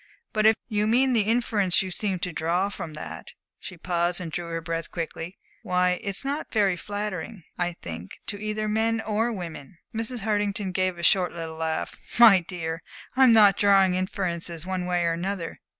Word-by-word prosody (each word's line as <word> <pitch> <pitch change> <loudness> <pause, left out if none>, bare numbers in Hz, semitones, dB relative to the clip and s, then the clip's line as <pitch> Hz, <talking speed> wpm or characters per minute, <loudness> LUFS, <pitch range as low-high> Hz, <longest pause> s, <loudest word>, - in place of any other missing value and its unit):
But 215 0 +4
if 220 - +6
you 210 -2 0
mean 255 +3 +3
the 230 - +4
inference 210 -6 +2
you 185 - -5
seem 195 0 -1
to 180 - -2
draw 175 +5 0
from 160 -6 -7
that" 80 - -8 0.3
she 180 - -8
paused 175 0 0
and 170 -3 -5
drew 175 0 -4
her 165 0 -2
breath 165 0 -4
quickly 165 +1 -5 0.2
"why, 180 -3 +1
it's 200 +6 -3
not 285 +2 -3
very 200 -4 +3
flattering, 205 0 -5 0.2
I 175 0 0
think, 85 - -8
to 205 -1 -5
either 215 0 -2
men 225 +1 +1
or 225 +2 0
women." 165 - -7 0.2
Mrs. 230 +2 -3
Hartington 205 -1 -1
gave 185 -1 0
a 170 - -7
short 180 +1 +3
little 165 -1 -6
laugh. 160 0 -2 0.2
"My 225 -5 +9
dear, 165 -1 -5 0.3
I'm 260 -2 +7
not 210 -4 +7
drawing 195 -2 +5
inferences 175 -3 -2
one 185 -1 -2
way 175 -1 +1
or 165 - +2
another. 175 0 -4
185 Hz, 180 wpm, -26 LUFS, 170-210 Hz, 0.3 s, My